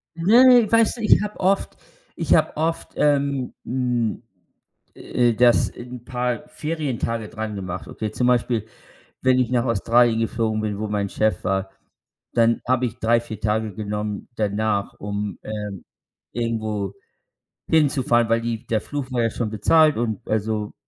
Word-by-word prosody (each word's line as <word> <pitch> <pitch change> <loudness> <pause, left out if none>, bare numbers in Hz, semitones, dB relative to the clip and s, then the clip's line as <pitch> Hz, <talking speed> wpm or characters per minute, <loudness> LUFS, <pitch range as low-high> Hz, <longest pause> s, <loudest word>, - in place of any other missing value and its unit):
Ne, 235 +7 +6
weißt 230 +1 +3
du, - - -7
ich 215 - +5
habe 210 0 -6
oft 195 +1 +1 0.4
ich - - +2
habe - - +1
oft, 165 +1 -2
ähm, 140 -3 +1
hm, 125 -3 -1 0.7
äh, 120 -1 +1
das 120 +1 +4
'n 120 0 -10
paar 125 +3 -2
Ferientage 130 -8 -3
drangemacht, 105 -5 -5
okay? 110 -1 -5
Zum 125 +3 0
Beispiel, 120 -3 +1 0.6
wenn 130 0 +4
ich 125 - +1
nach 120 -1 +1
Australien 115 +1 +3
geflogen 115 -1 -1
bin, 105 -2 -3
wo 110 - -2
mein 100 -1 -1
Chef 110 -3 0
war, 95 0 -1 0.6
dann 115 0 +3
habe 130 0 +2
ich 120 - -7
3, 115 +1 +3
4 110 -2 -8
Tage 110 0 -1
genommen 105 0 -4
danach, 105 -1 -1
um, 100 0 -4
ähm, 105 -3 -6 0.5
irgendwo 110 -4 -2 0.7
hinzufahren, 135 -7 +2
weil 115 0 +3
die 115 -1 -4
der 110 - +1
Flug 140 0 -5
war 120 -2 +1
ja 115 - +2
schon 115 0 -3
bezahlt 155 +8 +4
und 110 -3 -2
also, 110 -1 -1
115 Hz, 150 wpm, -22 LUFS, 105-130 Hz, 0.7 s, Ne